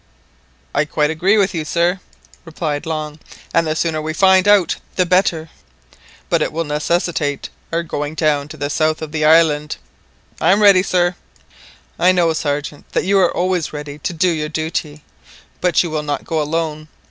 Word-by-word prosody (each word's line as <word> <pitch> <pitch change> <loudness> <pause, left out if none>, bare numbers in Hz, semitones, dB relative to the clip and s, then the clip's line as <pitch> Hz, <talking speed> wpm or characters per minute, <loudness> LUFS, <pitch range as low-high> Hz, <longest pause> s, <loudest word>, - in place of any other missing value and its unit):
"I 145 - +2
quite 150 0 0
agree 185 +7 +2
with 195 -2 +2
you, 165 -3 -2
sir," 170 +4 0 0.4
replied 160 -2 -4
Long, 155 -1 -4 0.3
"and 165 -1 +2
the 155 - -1
sooner 160 -1 -1
we 155 +1 -3
find 190 +1 +4
out 205 -4 +4 0.2
the 180 - +2
better" 175 -3 +1 0.8
"But - - +1
it - - 0
will 165 +2 -2
necessitate 150 -1 -1 0.2
our 170 +1 0
going 150 -1 -4
down 150 -3 +1
to 155 - -10
the 145 0 -3
south 155 +1 0
of 155 - -6
the 155 -1 -2
island." 155 -1 +3 0.6
"I - - +4
am 210 +1 +2
ready, 200 -3 +7
sir." 180 -1 +1 0.9
"I 185 +1 +5
know, 170 -3 +2
Sergeant, 145 -1 -4
that - - +1
you 195 +1 +3
are 180 -2 +3
always 180 -3 -1
ready 150 0 -7
to 165 - -3
do 175 +2 +1
your 155 -2 -2
duty, 155 -1 -4 0.6
but 180 0 +3
you 170 - -5
will 155 -1 -1
not 145 -2 -4
go 160 -1 -1
alone. 155 0 -3
160 Hz, 180 wpm, -18 LUFS, 150-175 Hz, 0.9 s, ready